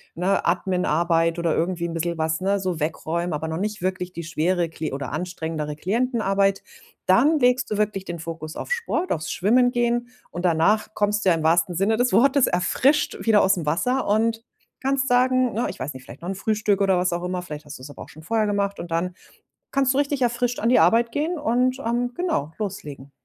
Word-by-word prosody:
ne, 180 +4 0
Adminarbeit 170 -2 +1
oder 170 -2 0
irgendwie 170 0 -1
'n 165 - -6
bissel 170 0 -2
was, 160 0 0
ne, 200 +2 +1
so 185 -4 -2
wegräumen, 165 +2 -2
aber 160 +2 -3
noch 160 - -3
nicht 210 +2 -3
wirklich 185 0 -3
die 170 - -6
schwere 170 +2 0
Kli 160 -3 -5
oder 140 +1 -4
anstrengendere 160 -4 -4
Klientenarbeit. 195 - 0 0.4
Dann 280 +12 +4
legst 250 0 +2
du 210 - -2
wirklich 210 -2 -1
den 170 -2 -6
Fokus 160 -1 -7
auf - - -6
Sport, 460 -7 -1
aufs 155 -2 -2
Schwimmen 245 +6 +3
gehen. 240 0 0 0.2
Und 175 +1 -4
danach 180 +6 +2
kommst 205 0 0
du - - +5
ja 170 - +4
im 160 - -3
wahrsten 170 +2 +2
Sinne 200 +5 +1
des 245 -2 +1
Wortes 270 +5 +4
erfrischt 260 +11 +1
wieder 220 -2 +5
aus'm 190 -4 +2
Wasser 250 - 0
und 225 +2 +1 0.4
kannst 270 0 0
sagen 255 0 +3
ne, 230 - -1
ich - - -8
weiß 145 - -4
nicht, 130 -1 -11
vielleicht 125 +4 -13
noch 175 - -7
'n 195 - -3
Frühstück 210 -1 0
oder 195 -2 +3
was 180 0 +1
auch 175 +1 -3
immer, 180 0 -2
vielleicht 150 -4 -8
hast 145 -2 -9
du's 130 - -10
aber 145 - -11
auch - - -10
schon 155 - -13
vorher 220 +4 +1
gemacht 200 -1 -1
und 170 - -9
dann 170 +2 -1 0.6
kannst 270 -1 +2
du 265 - -1
richtig 285 -1 0
erfrischt 245 0 0
an 230 - +1
die 250 - +5
Arbeit 230 +8 +4
gehen 315 +6 -1
und, 255 -1 +1
ähm, 245 +1 -1
genau, 160 - -2
loslegen. 150 -10 -6
190 Hz, 210 wpm, -23 LUFS, 165-240 Hz, 0.6 s, du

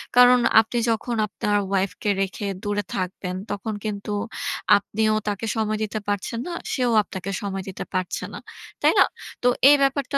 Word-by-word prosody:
কারণ 250 0 +8 0.2
আপনি 230 +2 -5
যখন 230 +1 -1
আপনার 205 +1 -1
ওয়াইফকে 195 +1 -1
রেখে 195 +2 -3 0.2
দূরে 205 0 -1
থাকবেন 185 -1 -3 0.2
তখন 215 +2 -3
কিন্তু 210 -1 -4 0.7
আপনিও 215 +2 0
তাকে 205 +2 -2
সময় 215 -1 0
দিতে 215 +1 -3
পারছেন 205 +3 -2
না, 350 - -4 0.2
সেও 250 -3 +1
আপনাকে 190 0 -6
সময় 195 -1 -3
দিতে 190 - -6
পারছে 185 -1 -2
না, - - -6 0.4
তাই - - +5
না? - - +8 0.4
তো - - +4 0.2
এই 290 - +8
ব্যাপারটা 275 +1 +1
210 Hz, 160 wpm, -24 LUFS, 195-230 Hz, 0.7 s, কারণ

